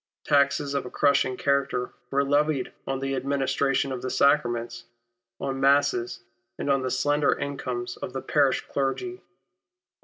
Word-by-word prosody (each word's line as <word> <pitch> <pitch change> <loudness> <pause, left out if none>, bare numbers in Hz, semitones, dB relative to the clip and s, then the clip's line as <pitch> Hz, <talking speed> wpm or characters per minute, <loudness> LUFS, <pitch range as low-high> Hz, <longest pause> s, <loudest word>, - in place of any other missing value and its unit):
Taxes 140 -1 +2
of 140 - 0
a 125 - -7
crushing 140 -2 +2
character 140 -3 0 0.2
were 140 +1 +2
levied 145 -1 +1
on 135 - -1
the 135 0 -2
administration 135 0 0
of 130 -2 -4
the 130 - -3
sacraments, 120 -5 +1 0.5
on 135 -1 -3
masses, 140 -4 +2 0.4
and 140 - -1
on 135 -1 +2
the 130 - -2
slender 145 +2 +2
incomes 125 -3 -4
of - - -6
the 130 +1 -4
parish 140 -3 +2
clergy. 360 - -2
135 Hz, 145 wpm, -26 LUFS, 130-140 Hz, 0.5 s, Taxes